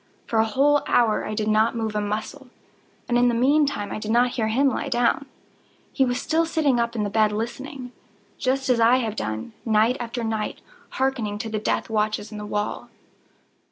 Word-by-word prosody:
For 225 - 0
a 220 - +4
whole 280 +6 +3
hour 225 -3 +2
I 215 - -3
did 215 0 -1
not 215 +2 +3
move 220 -2 -2
a 210 - +1
muscle, 215 +7 -4 0.6
and 240 0 +2
in 245 - +4
the 240 - +2
meantime 275 -3 +2
I - - -4
did 215 - -6
not 240 +2 +4
hear 225 -3 -1
him 260 +6 +2
lie 275 +1 -1
down. 245 +2 +1 0.7
He 265 - +3
was 245 0 -1
still 325 +4 +1
sitting 305 -6 +1
up 235 0 -1
in 215 - 0
the 205 - -1
bed 215 0 +3
listening;—just 255 +2 -5
as 250 -2 +3
I 230 +2 +5
have 225 -4 -2
done, 110 - -4
night 225 +3 +2
after 240 0 -4
night, 220 -1 -2 0.4
hearkening 250 -6 -1
to 220 +1 -5
the 215 -1 -2
death 215 - -1
watches 215 -1 -1
in 210 - -7
the 210 - -6
wall. 210 0 -3
230 Hz, 195 wpm, -24 LUFS, 215-260 Hz, 0.7 s, I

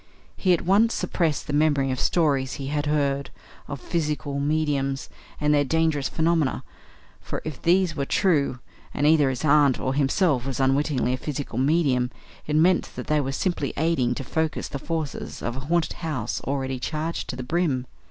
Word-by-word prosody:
He 185 - +1
at 175 - +3
once 210 +6 +3
suppressed 160 -5 -1
the 145 - -4
memory 145 -3 +2
of 130 - -2
stories 140 -6 +1
he 135 -1 -5
had 145 0 -1
heard 140 -2 0 0.4
of 140 - -5
"physical 150 -3 -2
mediums" 140 -2 0 0.3
and 150 0 +2
their 145 -1 +4
dangerous 155 -1 +1
phenomena; 160 -3 +1 0.6
for - - -5
if 155 -5 -6
these 175 -1 +3
were 140 - -1
true, 150 -10 +2 0.4
and 145 - +1
either 150 -3 +5
his 130 +3 -3
aunt 145 -3 +4
or 130 - -1
himself 140 -1 +1
was 135 -1 -3
unwittingly 135 -1 +1
a - - -1
physical 140 -4 -4
medium, 135 -4 +2 0.4
it 150 - 0
meant 170 +3 +3
that - - -5
they 150 -1 +2
were 135 -1 -2
simply 150 -1 -1
aiding 140 -6 +1
to 135 - -5
focus 160 +4 -2
the 140 - -5
forces 160 -1 -4
of 120 - -2
a - - -4
haunted 170 -1 +1
house 150 -10 -3
already 135 -1 -2
charged 155 +4 -3
to - - -3
the 130 - -5
brim. 140 -3 0
145 Hz, 180 wpm, -25 LUFS, 135-160 Hz, 0.6 s, either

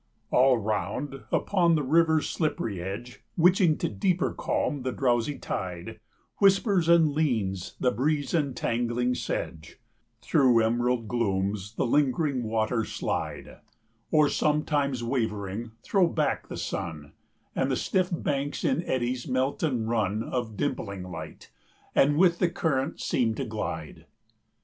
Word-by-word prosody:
All 130 0 +5
round, 110 +6 -3
upon 175 -4 +3
the 150 - 0
river's 160 +2 +3
slippery 115 - -2
edge, 100 +7 -7
Witching 180 -1 +4
to - - -1
deeper 175 - 0
calm 145 -3 -1
the 130 0 -2
drowsy 125 +2 0
tide, 90 -2 -5 0.4
Whispers 195 -3 +3
and 165 -3 +5
leans 110 - -1
the 125 - +2
breeze 145 +5 0
entangling 125 -5 0
sedge; 80 -9 -4 0.5
115 - - -21
Through 125 -4 +4
emerald 120 0 +1
glooms 100 -2 -1
the - - 0
lingering 140 +1 +1
waters 110 0 -1
slide, - - -4 0.5
Or, 150 -1 +4
sometimes 145 -4 0
wavering, 110 -3 -2
throw 190 -4 +3
back 155 -3 -1
the - - -6
sun, 80 -6 -5 0.4
And 130 - +1
the 135 - +1
stiff 185 +4 0
banks 145 -4 -2
in - - +2
eddies 125 -1 -1
melt 130 +2 0
and 125 -8 0
run 110 -2 0
Of 115 -5 -4
dimpling 100 -9 -3
light, 80 - -9 0.4
and 145 +2 +4
with 175 0 +4
the 180 - +3
current 150 -4 -1
seem 115 -3 0
to 135 - -3
glide. 110 -2 -5
125 Hz, 135 wpm, -27 LUFS, 110-150 Hz, 0.5 s, All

